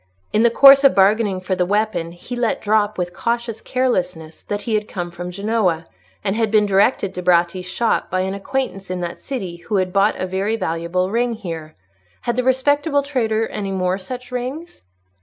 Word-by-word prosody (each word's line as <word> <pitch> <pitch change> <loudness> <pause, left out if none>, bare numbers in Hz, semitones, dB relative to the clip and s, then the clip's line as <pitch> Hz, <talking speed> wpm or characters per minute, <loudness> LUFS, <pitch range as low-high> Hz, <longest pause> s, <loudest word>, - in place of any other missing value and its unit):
In 215 - +3
the 235 - +5
course 275 +3 +8
of 275 - +5
bargaining 200 -1 +3
for 185 +1 -1
the 180 - +1
weapon, 190 -3 -1
he 210 +8 -7
let 240 -2 0
drop, 210 0 +1
with 180 -1 -3
cautious 235 -1 -2
carelessness, 180 -11 -2
that 205 0 -4
he 215 -1 0
came 175 -5 -6
from 175 +1 -6
Genoa, 195 -4 0 0.4
and 195 - 0
had 225 -1 +1
been 210 0 +4
directed 195 0 +2
to 180 - -5
Bratti's 175 +1 +2
shop 230 +5 0
by 185 +1 0
an 190 +1 -2
acquaintance 200 -2 -3
in 185 -1 -3
that 175 -1 -5
city 195 -11 -5
who 175 +5 -4
had 185 -2 0
bought 200 +2 +3
a - - -1
very 190 +4 -1
valuable 180 -1 -2
ring 240 +1 +1
here. 165 -7 -7 0.5
Had 240 - -1
the 250 - 0
respectable 285 +3 +2
trader 225 -6 0
any 200 -2 -4
more 185 0 0
such 250 +6 -8
rings? 260 +7 -5
205 Hz, 190 wpm, -20 LUFS, 180-235 Hz, 0.5 s, course